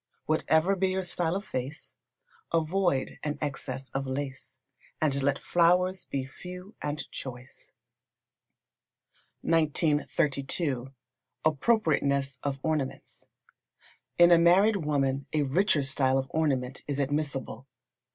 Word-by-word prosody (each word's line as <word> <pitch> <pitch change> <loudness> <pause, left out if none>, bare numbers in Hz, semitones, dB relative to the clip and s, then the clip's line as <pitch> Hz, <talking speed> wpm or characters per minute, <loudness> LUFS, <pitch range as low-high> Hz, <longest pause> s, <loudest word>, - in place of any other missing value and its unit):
Whatever 160 +4 +2
be 190 0 +1
your 190 0 -1
style 175 -1 0
of 200 +2 -3
face, 130 +5 -5 0.6
avoid 165 -3 0
an 150 -1 -3
excess 135 -2 -4
of 135 0 -3
lace, 130 -1 -5 0.4
and 140 -3 +1
let 140 0 +2
flowers 180 +2 +2
be 135 -1 -3
few 180 +8 -10
and 150 0 -3
choice. 130 0 -9 1.7
1932. 145 -3 0 0.5
Appropriateness 140 - +2
of 140 -1 -2
Ornaments. 155 -4 -3 0.9
In 175 0 +7
a 170 - +7
married 190 +6 +5
woman 135 -2 0
a 150 -1 +2
richer 150 +2 +2
style 135 0 +2
of 135 - 0
ornament 135 -5 -1
is 145 -2 -2
admissible. 140 -2 -2
145 Hz, 110 wpm, -28 LUFS, 135-170 Hz, 1.7 s, In